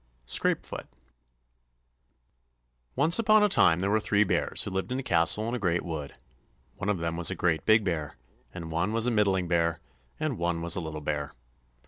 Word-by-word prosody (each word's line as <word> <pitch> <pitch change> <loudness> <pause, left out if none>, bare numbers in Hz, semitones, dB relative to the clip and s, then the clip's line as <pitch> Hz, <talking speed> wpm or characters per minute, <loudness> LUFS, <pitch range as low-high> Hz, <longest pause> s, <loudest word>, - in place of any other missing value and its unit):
Scrapefoot - - -1 2.1
Once 160 - +5
upon 215 -1 +4
a - - +5
time, 90 - +3
there 100 +1 0
were 110 - +3
three 105 0 +2
bears 105 - -1
who 100 - -6
lived 95 +5 -3
in 130 - -1
a 135 - -4
castle 85 +4 +2
in 115 - -3
a 125 - -2
great 90 -4 0
wood. 80 -4 -6 0.6
One 105 - -4
of 105 - +1
them 85 0 -3
was 85 -2 +4
a 95 - -3
great 85 -2 -1
big 110 0 +5
bear, 80 -6 -3 0.4
and 80 0 -8
one 85 +6 -1
was 115 0 +3
a 125 - +1
middling 100 -5 +1
bear, 85 -1 0 0.4
and - - -3
one 85 -1 -2
was 85 0 +2
a 90 - -3
little 80 -1 -6
bear. 75 -1 -3
90 Hz, 190 wpm, -27 LUFS, 85-110 Hz, 2.1 s, Once